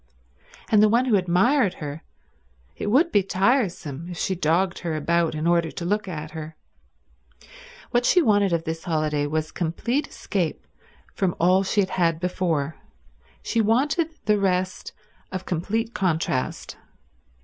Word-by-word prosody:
And 210 -2 +6
the 215 - +6
one 240 +4 +3
who 240 -5 +3
admired 190 +5 +2
her— 150 +1 -6 0.7
it - - -5
would 285 +11 +3
be 205 - +4
tiresome 185 - 0
if 175 - -7
she 190 - -1
dogged 175 +2 +1
her 165 -3 -3
about 165 +1 +1
in 155 +1 -3
order 170 -1 +2
to 170 - -6
look 205 +2 0
at 155 -3 -6
her. 160 0 -7 1.4
What 240 0 +2
she 360 - +4
wanted 205 - +3
of 165 -1 0
this 165 +1 -5
holiday 155 -3 0
was 155 +1 -2
complete 235 - -1
escape 180 -6 -3 0.5
from 185 -3 0
all 185 +3 +4
she 195 +2 +1
had 190 - -2
had 165 -3 +1
before, 165 -4 -1 0.7
she 230 - +1
wanted 275 +9 +2 0.2
the 210 0 +3
rest 185 -1 -1 0.4
of 185 0 -5
complete 220 +7 -2
contrast. 160 -8 -1
180 Hz, 150 wpm, -24 LUFS, 160-210 Hz, 1.4 s, And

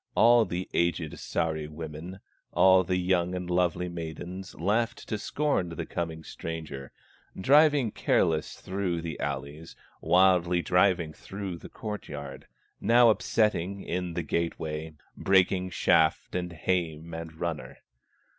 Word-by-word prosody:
All 120 -1 +6
the 90 +1 -4
aged 85 -2 0
Sahri 80 -2 -2
women, 80 +4 -8 0.3
All 95 0 +6
the 90 0 -1
young 90 0 +1
and 90 -1 -4
lovely 90 0 +1
maidens 85 +2 -7
Laughed 110 +6 -1
to 110 - -2
scorn 140 - 0
the 85 - -5
coming 80 -2 -4
stranger 75 -6 -7 0.5
Driving 145 +1 +5
careless 80 -5 +1
through 95 -3 -2
the 80 -3 -5
alleys, 75 +3 -5 0.3
Wildly 90 0 +4
driving 90 -3 +2
through 95 -2 -6
the - - -11
court 105 -2 -6
yard, 70 -2 -8 0.3
Now 120 0 +6
upsetting 100 -3 0
in 90 -1 -3
the 85 - -1
gate 85 +2 -1
way, 80 0 -5 0.2
Breaking 95 -1 +2
shaft, 80 -2 +2
and 90 -1 -2
hame, 85 -1 -2
and 80 -1 -7
runner. 85 -3 -4
90 Hz, 130 wpm, -28 LUFS, 80-95 Hz, 0.5 s, All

